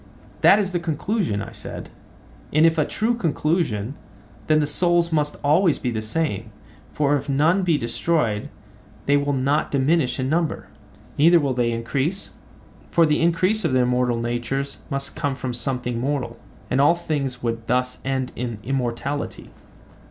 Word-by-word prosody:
That 195 - +7
is 200 -3 0
the 175 - 0
conclusion, 170 - -1
I - - -9
said; - - -7 0.6
and, 155 +2 +4
if 165 -1 +3
a 150 - +3
true 220 +8 0
conclusion, 155 - -1 0.5
then 155 0 +4
the 150 - +2
souls 170 +3 +2
must 150 -2 0
always 160 +3 +3
be 125 - -2
the 110 -2 -2
same, 110 -2 -2 0.4
for 145 -1 +2
if 140 0 -3
none 155 +7 +3
be 170 -4 +2
destroyed 115 -2 0 0.6
they 140 - +3
will 145 0 +1
not 140 +2 +1
diminish 140 0 +1
in 130 - 0
number. 160 +2 -1 0.5
Neither 170 +3 +6
will 140 -4 0
they 120 -1 +1
increase, 135 +11 -2 0.6
for 170 -2 +4
the 150 0 +1
increase 185 +6 +2
of 160 - 0
the 130 - +4
immortal 125 -1 +1
natures 120 +4 -3
must 140 0 -3
come 140 -2 -1
from 130 -2 -4
something 125 -1 -2
mortal, 125 -3 -2 0.3
and 130 +2 +3
all 150 +4 +5
things 140 -7 -3
would 115 -1 -3
thus 125 +1 0
end 130 -1 -2
in 120 -2 -4
immortality. 135 +2 -3
140 Hz, 160 wpm, -23 LUFS, 125-165 Hz, 0.6 s, That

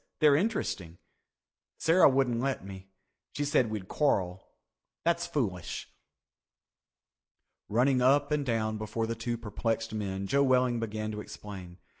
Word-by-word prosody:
They're 150 -3 +6
interesting. 140 - -1 0.8
Sarah 165 0 +5
wouldn't 130 -3 +1
let 135 -5 -1
me. 95 -1 -9 0.5
She 145 - -1
said 130 -5 +2
we'd 105 -4 -5
quarrel. 95 -11 0 0.6
That's 170 0 +1
foolish." 110 - -3 1.8
Running 125 +4 +3
up 145 +3 +4
and 150 -1 +1
down 110 -4 -1
before 110 +1 -2
the 115 - -2
two 120 +1 -3
perplexed 115 0 -2
men, 100 -2 -3
Joe 140 +8 +2
Welling 125 -3 +3
began 110 -1 -3
to 105 0 -5
explain. 95 -5 -9
115 Hz, 130 wpm, -30 LUFS, 105-140 Hz, 1.8 s, They're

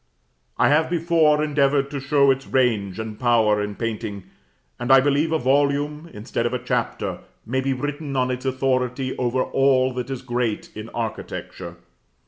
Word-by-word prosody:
I - - +4
have 155 +2 +3
before 165 -3 +3
endeavored 140 -2 +1
to 140 - -3
show 140 0 +3
its 135 0 -3
range 110 -7 +1
and 110 -1 -6
power 110 -4 +3
in 105 0 -4
painting; 110 -3 -4 0.6
and 120 +2 -1
I 135 - +9
believe 145 +4 +1
a 160 - +2
volume, 145 +3 0
instead 115 +2 -3
of 120 - -4
a 125 - -5
chapter, 125 -2 -2 0.3
might 130 +4 -2
be 135 - +1
written 145 +2 -4
on 130 -1 +1
its 125 0 -4
authority 130 0 -1
over 125 +1 +1
all 130 -1 +2
that 125 0 -4
is 135 -2 -5
great 120 -3 -2
in 110 +2 -7
architecture. 110 -6 -6
130 Hz, 165 wpm, -23 LUFS, 120-140 Hz, 0.6 s, I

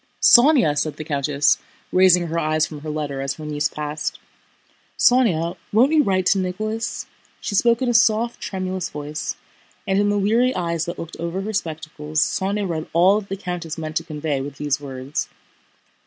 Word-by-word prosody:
"Sónya!" 245 - +6
said 150 +1 -1
the 155 - -5
countess, 145 -1 +1 0.3
raising 180 -1 +5
her 165 0 -2
eyes 155 -1 +1
from 155 -1 -8
her 155 +1 -7
letter 145 -3 -3
as 135 0 -2
her 155 - -9
niece 150 0 -1
passed, 150 0 -4 0.8
"Sónya, 185 -9 +3 0.2
won't 245 +7 +4
you 315 -1 +5
write 190 -7 +1
to 195 - +3
Nicholas?" 215 +5 -3 0.3
She - - -4
spoke 235 +4 +3
in - - 0
a 240 - +2
soft, 230 +1 +2
tremulous 185 -2 -3
voice, 150 +1 -5 0.5
and 195 0 +1
in 205 0 +2
the 205 - +1
weary 230 +6 +2
eyes 170 -2 -1
that 170 - -5
looked 165 - -8
over 170 +3 -3
her 215 +2 -4
spectacles 155 -4 -3
Sónya 195 +5 0
read 160 -2 -3
all 185 +5 +5
that 200 - -16
the 195 - -3
countess 175 -4 -5
meant 155 -1 -5
to 165 - -1
convey 150 -3 -3
with 140 +1 -6
these 145 0 -1
words. 135 0 -4
170 Hz, 185 wpm, -22 LUFS, 150-205 Hz, 0.8 s, Sónya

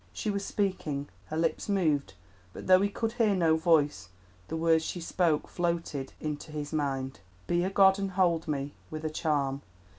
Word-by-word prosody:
She 215 - -2
was 200 0 -2
speaking; 160 -9 -2 0.2
her 155 - -4
lips 165 +5 0
moved, 155 - +1 0.4
but - - -8
though 185 0 +6
he 200 - +2
could 225 +2 -2
hear 220 -3 +2
no 165 -3 +3
voice 150 - +2 0.4
the 160 - -3
words 160 0 +3
she 175 - -4
spoke 165 -2 +1
floated 170 -6 -2
into 155 0 -5
his 150 0 -5
mind— 135 -3 -2 0.3
"Be 175 0 +1
a 185 - 0
god 195 0 +5
and 195 0 -1
hold 175 -3 +2
me 145 -1 -2 0.2
With 155 0 -6
a 155 - -1
charm! 140 -4 0
160 Hz, 180 wpm, -29 LUFS, 145-185 Hz, 0.4 s, though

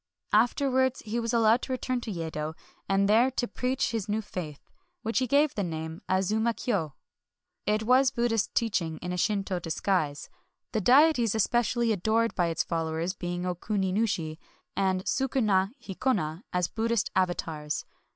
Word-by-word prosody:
Afterwards 260 +3 +2
he 220 +3 -2
was 230 -1 -1
al 235 - +2
lowed 225 +3 +4
to - - -5
return 255 0 -2
to 230 - -5
Yedo, 160 -3 -4 0.3
and 195 0 +3
there 230 +5 +5
to 255 -2 -2
preach 255 +2 -1
his 220 -4 -3
new 210 +1 +1
faith, 160 -8 -6
— - - -48
to - - -37 0.3
which 225 +2 +1
he 255 - 0
gave 285 +3 +3
the 205 - -2
name 160 -2 -4
of 185 - +3
Azuma 220 +5 +1
Kyo. 165 - -2 0.7
It 215 +1 +2
was 255 +3 +5
Bud 240 -1 0
dhist 225 -2 0
teaching 185 -9 0
in 180 - -3
a - - -3
Shinto 195 -1 0
disguise, 160 -3 -1 0.2
— - - -55
the 220 - +1
deities 250 - +5
especially 235 +1 +2
adored 220 +3 +1
by 175 -2 +1
its 165 -1 0
followers 165 +1 -2
being 175 -1 -4
Okuni 185 +2 -1
nushi 175 -7 -1 0.4
and 190 -1 +1
Sukuna 215 -8 +1 0.2
hi 195 - -5
kona 185 -6 -1
as 180 -1 +1
Buddhist 230 -1 -1
avatars. 165 -5 -1
210 Hz, 175 wpm, -28 LUFS, 175-235 Hz, 0.7 s, there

